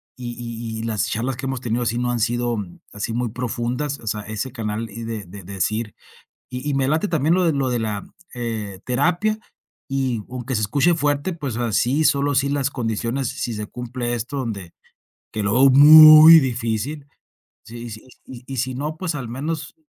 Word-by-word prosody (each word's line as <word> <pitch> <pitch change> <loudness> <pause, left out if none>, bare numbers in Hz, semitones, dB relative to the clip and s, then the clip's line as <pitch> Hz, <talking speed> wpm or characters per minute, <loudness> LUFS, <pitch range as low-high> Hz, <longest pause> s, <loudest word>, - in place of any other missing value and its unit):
y 120 -1 -7
y 115 -1 -6
y - - -6
las 110 -3 -1
charlas 120 +3 -2
que 135 - -4
hemos 135 -1 -3
tenido 120 0 -2
así 120 -1 -1
no 120 0 0
han 120 - -1
sido, 120 +1 0 0.4
así 105 +2 -4
muy 120 0 -1
profundas. 125 +4 -3
O - - -14
sea, 105 0 -2
ese 110 +5 -5
canal 110 -2 -4
y 115 +3 -7
de 110 -3 -5
de 100 +3 -11
decir 100 +4 -3 0.6
y 130 +3 -5
y 145 - 0
me 135 -1 +1
late 155 +7 +1
también 160 -3 +1
lo 185 - +2
de 165 - +3
lo 140 -2 0
de 120 - 0
la 105 -3 -3 0.3
eh, 110 -5 -5
terapia, 175 - 0 0.5
y 130 -5 -2
aunque 125 0 -4
se 110 - -1
escuche 140 +11 +2
fuerte, 145 +2 0
pues, 140 -8 -5
así 120 +5 +1
solo 145 -1 +2
sí 140 +1 +2
las 140 -1 0
condiciones 120 +1 -2
si 120 - -4
se 105 0 -5
cumple 120 0 -4
esto 120 +5 -4
donde 100 -9 -5 0.6
que 110 -1 -3
lo 100 - +1
veo 135 +2 +6
muy 155 +3 +10
difícil. 125 +3 -3 0.6
Sí, 120 - -10
y - - -7
si 110 +1 -9 0.2
y 130 +1 -9
si 130 +1 -1
no, 150 +4 -4
pues, 180 -1 -3
al 135 -5 -5
menos 145 +4 -4
125 Hz, 195 wpm, -21 LUFS, 115-140 Hz, 0.6 s, muy